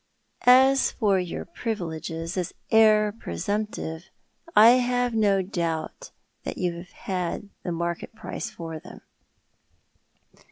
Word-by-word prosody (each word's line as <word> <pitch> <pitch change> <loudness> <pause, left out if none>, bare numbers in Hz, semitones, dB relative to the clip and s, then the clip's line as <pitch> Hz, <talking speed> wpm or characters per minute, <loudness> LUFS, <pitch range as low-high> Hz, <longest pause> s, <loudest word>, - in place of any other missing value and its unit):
"As 265 +2 +6
for 200 -5 +2
your 180 -2 -4
privileges 165 - -4
as 180 -3 -3 0.2
heir 215 -1 +5
presumptive 200 - -4 0.5
I 220 +2 +9
have 245 -1 0
no 200 -3 +3
doubt 170 - -3 0.3
you 180 -2 -2
have 175 +1 -10
had 185 +2 -4
the 175 - -4
market 170 +4 -3
price - - -5
for 165 -2 -7
them." - - -13
195 Hz, 110 wpm, -25 LUFS, 170-220 Hz, 0.5 s, I